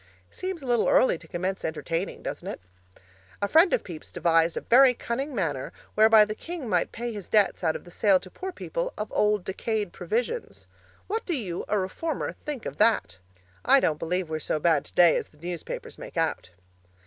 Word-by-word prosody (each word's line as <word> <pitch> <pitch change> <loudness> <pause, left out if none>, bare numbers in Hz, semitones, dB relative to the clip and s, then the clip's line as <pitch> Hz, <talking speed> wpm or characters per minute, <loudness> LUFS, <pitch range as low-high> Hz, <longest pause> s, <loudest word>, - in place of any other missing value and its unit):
Seems 370 -5 -5
a - - -7
little 240 -2 +2
early 215 -10 +4
to 160 - -15
commence 185 +3 -3
entertaining, 165 +3 -3
doesn't - - -5
it? - - -5 0.8
A 200 - 0
friend 325 - +5
of - - +1
Pepys 165 -4 -9
devised 165 0 +2
a - - -1
very 250 +1 +6
cunning 265 +5 -3
manner 155 - -2 0.2
whereby 220 0 +7
the 210 - -4
king 330 +2 -7
might 180 -5 +1
pay 235 0 -4
his 205 -4 -8
debts 210 -3 +3
out 160 -2 +2
of - - -6
the 175 - -14
sale 195 0 +3
to 185 - -13
poor 380 0 -6
people - - -4
of 210 - -4
old 210 -2 +2
decayed 210 +1 -2
provisions. 235 - -3 0.4
What 440 +3 -2
do 345 -5 +1
you, 180 -6 -4
a 210 - +1
reformer, 200 - -2 0.2
think 285 -6 -4
of - - -5
that? 210 - +2 0.4
I 275 +2 +6
don't 155 - 0
believe 180 +2 -1
we're 155 0 -3
so 155 - -2
bad 155 -2 +2
today 175 -2 +5
as - - -2
the 150 - -25
newspapers 170 +1 -6
make - - -9
out. - - -1
210 Hz, 195 wpm, -26 LUFS, 170-250 Hz, 0.8 s, whereby